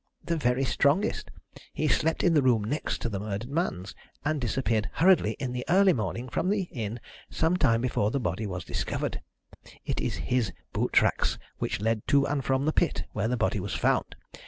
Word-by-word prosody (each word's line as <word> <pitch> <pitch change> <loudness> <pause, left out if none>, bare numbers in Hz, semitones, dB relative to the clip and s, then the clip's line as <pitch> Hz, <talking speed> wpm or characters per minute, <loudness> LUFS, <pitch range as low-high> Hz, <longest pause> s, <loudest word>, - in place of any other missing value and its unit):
"The 170 - -1
very 130 -3 +1
strongest. 145 - +1 0.4
He - - 0
slept 160 - +1
in 175 - +4
the 150 - +5
room 120 -5 +3
next 145 +9 -2
to - - +1
the 100 -3 -3
murdered 105 +2 -4
man's, 95 - -2 0.3
and 150 -1 0
disappeared 115 -3 0
hurriedly 170 - +4
in 130 -3 -3
the 125 0 -3
early 190 +1 +5
morning 115 +3 -3
from 170 +8 -1
the 200 -1 +1
inn 115 -1 -4 0.3
some 165 +2 +1
time 115 -9 +3
before 120 -4 +1
the 140 - -1
body 105 -1 -2
was 90 -3 -5
discovered. - - -3 0.6
It - - -2
is - - -1
his 120 -8 -1 0.2
boot - - 0
tracks - - +3 0.2
which - - -2
led 110 0 0
to 140 -1 +4
and 145 -2 -1
from 135 +1 +1
the 155 - +1
pit 170 - +1
where 105 +1 0
the 125 +2 0
body 110 -2 0
was 100 +1 -4
found. - - +1
125 Hz, 195 wpm, -28 LUFS, 110-150 Hz, 0.6 s, the